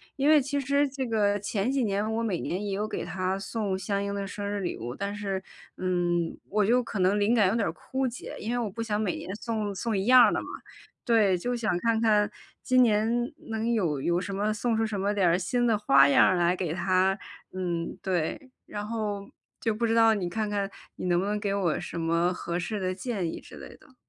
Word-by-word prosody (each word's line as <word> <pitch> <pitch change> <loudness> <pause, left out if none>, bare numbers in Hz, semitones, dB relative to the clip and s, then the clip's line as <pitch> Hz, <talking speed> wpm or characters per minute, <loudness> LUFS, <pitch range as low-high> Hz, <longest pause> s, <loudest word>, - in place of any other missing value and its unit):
因 280 +2 +2
为 305 -2 +7
其 285 +2 -2
实 280 +1 +2
这 265 -1 -4
个 205 -3 +1
前 205 +2 -2
几 270 -1 +1
年 205 0 0
我 230 +1 -1
每 190 -7 -1
年 185 +4 -3
也 200 - -3
有 210 +2 -1
给 - - -4
她 185 +2 -2
送 195 -1 -2
相 200 +1 -2
应 200 0 -3
的 200 -1 -3
生 200 +1 -5
日 205 -1 -2
礼 175 - -3
物， 120 +2 -6
但 200 0 -3
是， 195 -2 -3 0.3
嗯， 175 -2 0
我 210 0 +1
就 245 +4 +4
可 230 -4 -5
能 190 +3 +3
灵 210 +4 +3
感 210 -5 +4
有 220 - 0
点 210 - +1
儿 165 - -3
枯 265 +7 -2
竭， 240 - -7
因 225 +3 -3
为 245 - 0
我 230 -3 -1
不 230 +4 -6
想 215 -2 -1
每 200 -5 -1
年 185 +3 -6
送 215 -2 -3
送 220 +2 -1
一 190 - -1
样 250 -1 +7
的 - - 0
嘛。 - - -7 0.6
对， 220 -6 +4
就 245 +8 -2
想 220 -7 0
看 230 +2 +1
看 210 -2 +3 0.3
今 255 0 +4
年 220 -1 +3 0.4
能 225 +1 -1
有 170 -10 0
有 175 +5 +1
什 200 +1 -5
么 210 +2 0
送 225 +1 0
出 225 - +2
什 210 -3 -3
么 200 +1 +1
点 195 -4 +2
儿 170 +1 +4
新 240 +7 0
的 225 - +3
花 140 -9 +6
样 140 - +6
儿 185 - +3
来 175 0 +2
给 175 -4 -2
她。 185 +1 +2 0.4
嗯， 175 -3 -3
对， 190 - -2 0.2
然 210 0 -5
后 210 -3 -3 0.3
就 225 -2 0
不 235 +2 -1
知 225 - +1
道， 225 -1 +6
你 185 -4 -2
看 215 +3 -2
看 200 -1 -1 0.3
你 - - -4
能 175 -1 +3
不 190 - -1
能 210 +1 0
给 205 -1 -1
我 190 -5 0
什 175 -1 -6
么 170 +2 +1
合 170 -1 -3
适 205 +4 -3
的 185 -1 -1
建 200 -4 -3
议 - - -7
之 - - -13
类 - - -9
的？ 265 -4 -22
205 Hz, 260 characters per minute, -27 LUFS, 185-225 Hz, 0.6 s, 为